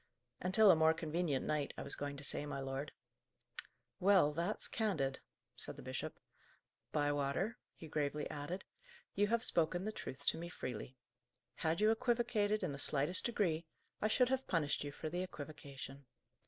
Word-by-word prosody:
"Until 190 Hz, +3 st, +7 dB
a -, -, +7 dB
more 160 Hz, 0 st, +5 dB
convenient 160 Hz, -3 st, 0 dB
night, 150 Hz, -2 st, -1 dB
I -, -, -3 dB
was -, -, -3 dB
going 140 Hz, 0 st, -4 dB
to 140 Hz, -, -7 dB
say, 145 Hz, +1 st, -1 dB
my 140 Hz, -, -3 dB
lord." 135 Hz, +2 st, -3 dB, 1.1 s
"Well, 185 Hz, -6 st, +6 dB
that's 170 Hz, +7 st, +2 dB
candid," 165 Hz, -, 0 dB, 0.4 s
said -, -, -4 dB
the -, -, -10 dB
bishop. -, -, -4 dB, 0.7 s
"Bywater," 145 Hz, -, 0 dB, 0.2 s
he 160 Hz, -, -9 dB
gravely 150 Hz, -1 st, -1 dB
added, 155 Hz, +6 st, -4 dB, 0.5 s
"you 205 Hz, +1 st, +3 dB
have 230 Hz, +1 st, +2 dB
spoken 175 Hz, +3 st, +2 dB
the 215 Hz, -, -1 dB
truth 140 Hz, -8 st, -6 dB
to -, -, -2 dB
me 170 Hz, +1 st, -5 dB
freely. 130 Hz, -5 st, -5 dB, 0.6 s
Had 165 Hz, +3 st, 0 dB
you 215 Hz, +1 st, +6 dB
equivocated 225 Hz, -3 st, +2 dB
in -, -, 0 dB
the 140 Hz, -, -5 dB
slightest 145 Hz, -, +2 dB
degree, 170 Hz, -8 st, 0 dB, 0.3 s
I 215 Hz, -, +3 dB
should 250 Hz, +3 st, +4 dB
have 265 Hz, 0 st, 0 dB
punished 150 Hz, -5 st, +1 dB
you 145 Hz, -, -4 dB
for 155 Hz, -, -5 dB
the 175 Hz, +3 st, -2 dB
equivocation. 140 Hz, -5 st, -7 dB
160 Hz, 165 wpm, -37 LUFS, 145-205 Hz, 1.1 s, Until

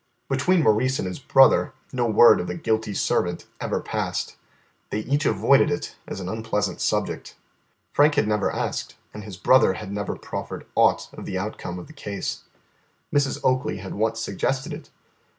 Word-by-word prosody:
Between 185 Hz, -3 st, +2 dB
Maurice 130 Hz, +4 st, +3 dB
and -, -, -2 dB
his 90 Hz, -, -5 dB
brother 135 Hz, +1 st, +5 dB, 0.2 s
no 125 Hz, -2 st, +1 dB
word 115 Hz, +2 st, +7 dB
of 90 Hz, -, -3 dB
the 90 Hz, -, -3 dB
guilty 110 Hz, -1 st, -1 dB
servant 90 Hz, -2 st, 0 dB
ever -, -, -1 dB
passed. -, -, -3 dB, 0.5 s
They 105 Hz, -, -2 dB
each 145 Hz, +4 st, 0 dB
avoided 125 Hz, +8 st, +4 dB
it 145 Hz, 0 st, -3 dB
as -, -, -5 dB
an 90 Hz, -, -5 dB
unpleasant 105 Hz, -2 st, -2 dB
subject. -, -, -1 dB, 0.6 s
Frank 145 Hz, +1 st, +4 dB
had 145 Hz, -, +2 dB
never 105 Hz, -1 st, +1 dB
asked -, -, -3 dB, 0.2 s
and 105 Hz, -, -8 dB
his 100 Hz, -3 st, -9 dB
brother 115 Hz, +1 st, +5 dB
had 100 Hz, 0 st, -7 dB
never 100 Hz, 0 st, -3 dB
proffered -, -, -6 dB
aught -, -, +3 dB
of -, -, -9 dB
the 95 Hz, -, -3 dB
outcome 95 Hz, -2 st, -5 dB
of 90 Hz, -, -8 dB
the -, -, -14 dB
case. 100 Hz, -9 st, -5 dB, 0.7 s
Mrs. 140 Hz, -1 st, +1 dB
Oakley 130 Hz, -4 st, +1 dB
had 95 Hz, 0 st, -7 dB
once 110 Hz, +2 st, 0 dB
suggested 130 Hz, -, -2 dB
it. 150 Hz, -, -9 dB
110 Hz, 170 wpm, -24 LUFS, 100-135 Hz, 0.7 s, word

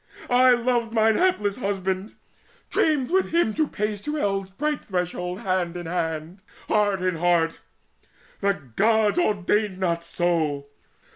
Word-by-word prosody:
I 250 Hz, +1 st, +6 dB
loved 240 Hz, -1 st, 0 dB
mine 220 Hz, -1 st, +4 dB
hapless 210 Hz, -, +1 dB
husband 195 Hz, -2 st, -2 dB, 0.6 s
dreamed 295 Hz, -4 st, +1 dB
with 380 Hz, +1 st, +2 dB
him 335 Hz, -10 st, +2 dB
To 310 Hz, +3 st, +1 dB
pace 210 Hz, -3 st, -3 dB
to 295 Hz, +5 st, -3 dB
eld's 195 Hz, -7 st, -1 dB
bright 295 Hz, +9 st, -2 dB
threshold 180 Hz, 0 st, -3 dB
hand 185 Hz, -4 st, -1 dB
in 175 Hz, -, -6 dB
hand, 165 Hz, +1 st, -3 dB, 0.3 s
And -, -, 0 dB
heart 205 Hz, -3 st, +2 dB
in 185 Hz, -2 st, 0 dB
heart! 170 Hz, -1 st, +1 dB, 0.8 s
The 200 Hz, 0 st, +1 dB, 0.2 s
gods 220 Hz, -, +3 dB
ordained 210 Hz, -, +1 dB
not 170 Hz, -3 st, -1 dB
so. 160 Hz, -5 st, -1 dB
200 Hz, 140 wpm, -24 LUFS, 180-230 Hz, 0.8 s, I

